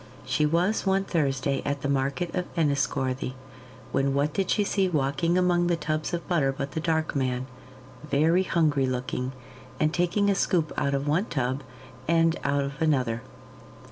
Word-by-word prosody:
She 150 Hz, -, +2 dB
was 175 Hz, +7 st, +1 dB
one 195 Hz, 0 st, +3 dB
Thursday 140 Hz, -6 st, 0 dB
at 145 Hz, 0 st, -2 dB
the -, -, 0 dB
market 140 Hz, +5 st, -1 dB
of 180 Hz, -1 st, -2 dB
Enniscorthy, 140 Hz, -4 st, 0 dB, 0.6 s
when 135 Hz, 0 st, +1 dB
what 145 Hz, +1 st, +1 dB
did 195 Hz, -2 st, -1 dB
she 210 Hz, -, +3 dB
see 195 Hz, -1 st, +1 dB
walking 150 Hz, +2 st, +1 dB
among 175 Hz, -1 st, +3 dB
the 175 Hz, -, +2 dB
tubs 155 Hz, 0 st, -2 dB
of 170 Hz, -1 st, -4 dB
butter 150 Hz, -7 st, +2 dB
but 140 Hz, +1 st, -5 dB
the 160 Hz, -, -3 dB
Dark 160 Hz, -1 st, 0 dB
Man, 130 Hz, -2 st, 0 dB, 0.6 s
very 155 Hz, +5 st, +3 dB
hungry 155 Hz, -7 st, +2 dB
looking, 125 Hz, 0 st, -2 dB, 0.5 s
and 155 Hz, +1 st, +2 dB
taking 175 Hz, +4 st, +1 dB
a 200 Hz, -, +4 dB
scoop 170 Hz, -5 st, +1 dB
out 140 Hz, -1 st, 0 dB
of 140 Hz, +1 st, -2 dB
one 165 Hz, +8 st, +2 dB
tub 130 Hz, -, -2 dB, 0.5 s
and 165 Hz, 0 st, +3 dB
out 140 Hz, 0 st, +1 dB
of 140 Hz, +3 st, -6 dB
another. 130 Hz, -7 st, +1 dB
150 Hz, 170 wpm, -26 LUFS, 135-170 Hz, 0.6 s, a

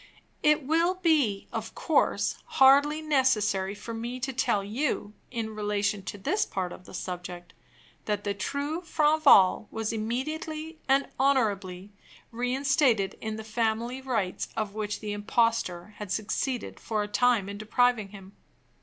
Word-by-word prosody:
It 300 Hz, 0 st, +3 dB
will 335 Hz, +5 st, +2 dB
be, 300 Hz, -, +1 dB
of -, -, -5 dB
course, -, -, +1 dB, 0.2 s
hardly 285 Hz, +3 st, +6 dB
necessary 210 Hz, -10 st, +1 dB
for 230 Hz, +3 st, -7 dB
me 235 Hz, +3 st, -5 dB
to 265 Hz, +1 st, -2 dB
tell 210 Hz, -5 st, +1 dB
you, 210 Hz, -1 st, -2 dB, 0.2 s
in 225 Hz, -3 st, -4 dB
relation 205 Hz, -1 st, -1 dB
to 205 Hz, -, -5 dB
this 390 Hz, -, 0 dB
part 185 Hz, -2 st, -3 dB
of 180 Hz, -, -13 dB
the -, -, -13 dB
subject, 180 Hz, -1 st, -6 dB, 0.5 s
that 205 Hz, -1 st, -1 dB
the 205 Hz, -, -1 dB
true 285 Hz, -, -3 dB
Franval 300 Hz, -, +5 dB
was 225 Hz, 0 st, -3 dB
immediately 310 Hz, +8 st, -4 dB
and 275 Hz, +1 st, +3 dB
honorably 205 Hz, -8 st, +1 dB, 0.4 s
reinstated 245 Hz, -4 st, +1 dB
in 220 Hz, -1 st, -3 dB
the 220 Hz, -, -6 dB
family 230 Hz, +3 st, -1 dB
rights 225 Hz, -8 st, -2 dB
of 215 Hz, -2 st, -2 dB
which 210 Hz, -1 st, -3 dB
the 210 Hz, -1 st, -4 dB
impostor 210 Hz, -3 st, 0 dB
had 210 Hz, -3 st, -7 dB
succeeded 225 Hz, +4 st, -2 dB
for 215 Hz, -2 st, -2 dB
a -, -, -4 dB
time 210 Hz, -1 st, +2 dB
in 200 Hz, 0 st, -6 dB
depriving 225 Hz, 0 st, +2 dB
him. 195 Hz, -1 st, -12 dB
225 Hz, 145 wpm, -28 LUFS, 205-270 Hz, 0.5 s, hardly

